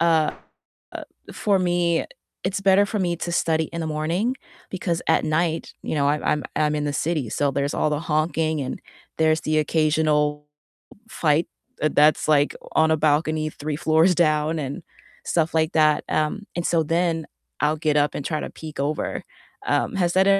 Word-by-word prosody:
uh 165 -2 +3 0.6
uh, - - -6 0.3
for 200 -2 +1
me, 175 -2 +1 0.4
it's 195 +1 -2
better 195 +1 +5
for 215 - -3
me 175 -2 0
to 170 +1 -4
study 160 -2 +1
in 170 - -3
the - - -2
morning 165 +11 -1 0.4
because 175 -2 -2
at - - +3
night, 160 +1 -1
you - - -3
know, 140 -1 +2
I'm 150 +1 0
I'm 150 -2 0
I'm 150 -1 +1
in 150 - -1
the 145 - -2
city, 150 -4 -1
so 140 +4 0
there's 140 +1 -1
all 155 - +1
the 150 - 0
honking 155 0 0
and 130 - -5 0.4
there's 160 0 +3
the 155 0 +1
occasional 150 -1 +1 0.6
fight, 155 -3 +1 0.4
uh, 155 - +4
that's, 150 +1 +4
like, 145 -1 +3 0.2
on 160 0 +4
a 160 - +3
balcony 155 +1 +1
3 150 0 -4
floors 160 +4 +3
down 155 -1 +2
and 145 +5 -4 0.4
stuff 165 -1 0
like 160 0 +1
that, 155 -1 +3
um, 155 +7 -1
and 175 0 -2
so 170 -1 +2
then 165 0 0 0.4
I'll 150 +1 +2
get 150 -1 +1
up 145 0 +1
and 140 - -4
try 155 -2 -1
to - - -5
peek 155 -3 -9
over, 145 +2 -2 0.4
um, - - 0
has 175 -3 +1
that 190 +1 +4
155 Hz, 180 wpm, -23 LUFS, 150-170 Hz, 0.6 s, better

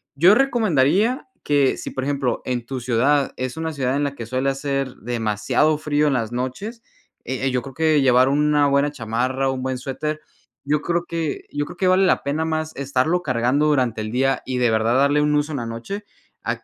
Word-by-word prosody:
Yo 175 +8 +6
recomendaría 220 - +2 0.2
que 145 -2 +2
si, - - -6
por 130 - -3
ejemplo, 140 -4 -1
en 125 -2 -2
tu 130 +1 -4
ciudad 130 +4 +1
es 130 +3 -4
una 160 -1 -3
ciudad 130 -1 -1
en 145 - 0
la 140 0 -3
que 115 - -6
suele 130 +4 -1
hacer 135 -1 -2
demasiado 115 +6 0
frío 150 0 +1
en 145 - +2
las 115 -3 -1
noches, 130 - -4 0.5
e 130 +1 -2
eh, - - 0
yo 125 -1 0
creo 135 -1 -9
que 155 0 +2
llevar 130 0 +4
una 145 +1 +3
buena 140 +1 +2
chamarra, 130 +2 -1
un 130 -1 -4
buen 130 -1 -2
suéter. 150 +4 -4 0.4
Yo 150 +1 0
creo 170 0 -1
que 165 -3 -3
yo 145 0 -2
creo 175 +3 -11
que 185 - +1
vale 185 +1 +4
la - - +2
pena 150 +3 -1
más 160 0 -2
estarlo 140 +6 0
cargando 125 +3 +1
durante 125 -7 +1
el 110 0 -4
día 135 +2 +1
y 130 -1 -3
de 120 -2 +3
verdad 110 +2 +2
darle 145 +2 +3
un 150 0 +2
uso 150 +1 0
en 140 - -2
la 120 - -4
noche 115 - -6 0.4
a - - -3
140 Hz, 215 wpm, -22 LUFS, 125-150 Hz, 0.5 s, Yo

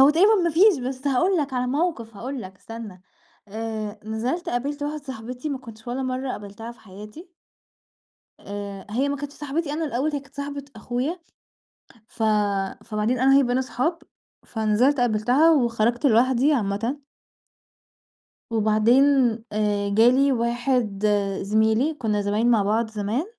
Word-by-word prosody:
هو 275 +2 +8
تقريبًا 390 +8 +5
ما 340 - +2
فيش، 360 +1 +5
بس 260 +2 -5
هقول 350 +8 +2
لَك 285 -4 -1
على 250 -1 -1
موقف، 255 - -2
هقول 260 +5 -5
لَك 190 +1 -10
استنّى، 215 -4 -10 0.5
آآ، 215 0 -5
نزلت 245 - -3
قابلت 285 +3 -2
واحدة 295 0 -3
صاحبتي 250 +1 -6
ما 280 -2 -3
كنتش 230 -3 -13
ولا 255 +2 -2
مرة 255 0 -2
قابلتها 210 +2 -7
في 235 - -22
حياتي. 210 - -12 1.1
آآ، 200 -1 -7
هي 260 +7 0
ما 285 - -1
كانتش 285 0 -7
صاحبتي 295 +1 -3
أنا 320 +1 -2
الأول، 280 +3 -1
هي 290 - -1
كانت 275 0 -20
صاحبة 280 0 -5
أخويا، 250 - -3 0.9
ف 225 - -7 0.6
فبعدين 215 +3 -1
أنا 265 +2 +4
وهي 275 - +6
بقينا 250 +1 +1
أصحاب، 290 +6 -1 0.5
فنزلت 225 +5 +2
قبلتها 245 +7 +3
وخرجت 240 -2 +1
لوحدي 255 +4 +4
عامةً. 230 +2 -1 1.5
وبعدين 220 +4 +4 0.5
آآ، 205 -1 0
جالي 245 +7 +4
واحد 235 -3 0 0.4
زميلي، 220 +8 +2
كنا 220 -8 -1
زمايل 205 +3 0
مع 230 -4 +4
بعض 220 +3 0
زمان، 220 - -2
245 Hz, 145 wpm, -24 LUFS, 220-280 Hz, 1.5 s, هو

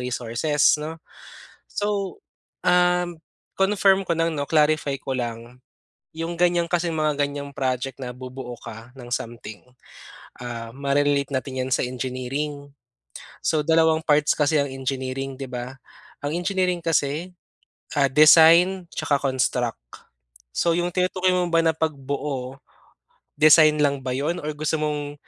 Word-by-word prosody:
resources 125 +5 +1
no. 160 +2 -5 0.7
So, 205 -2 -3 0.4
um, 180 -1 +2 0.4
confirm 195 -1 +3
ko 170 - +1
lang 165 -1 -1
'no 145 - -2
clarify 150 -2 +2
ko 130 -1 -3
lang. 120 +1 -6 0.6
Yung 165 +1 -4
ganyan 175 -1 +2
kasing 175 -1 0
mga 155 -2 0
ganyang 140 0 -7
project 130 -1 -3
na 125 -2 -6
bubuo 130 -1 -8
ka 115 +3 -10
ng 120 -2 -11
something, 115 -2 -6 0.8
ah, 115 -1 -6
mare-relate 140 0 +1
natin 130 0 -2
yan 130 - -6
sa - - +1
engineering. 135 +3 -4 0.7
So 155 - +1
dalawang 160 0 +3
parts 150 -1 +4
kasi 150 +1 +2
ang 140 -1 -1
engineering, 135 0 -4
d'i 135 0 -7
ba? 125 +1 -6 0.5
Ang 150 +3 -2
engineering 180 -2 0
kasi, 165 +1 -1 0.7
ah, 140 -1 +4
design 165 +5 +6
tsaka 140 -1 0
construct. 125 -3 -1 0.7
So 165 - +1
yung 175 +1 0
tinutukoy 185 +1 +1
mo 180 -1 +1
ba 165 0 +3
na 165 - +3
pagbuo, 140 -3 -3 0.8
design 155 0 +6
lang 140 -2 +1
ba 130 - -3
yun 150 +6 -2
or 150 - -3
gusto 155 +1 -1
mong 145 -1 -2
145 Hz, 135 wpm, -23 LUFS, 130-165 Hz, 0.8 s, design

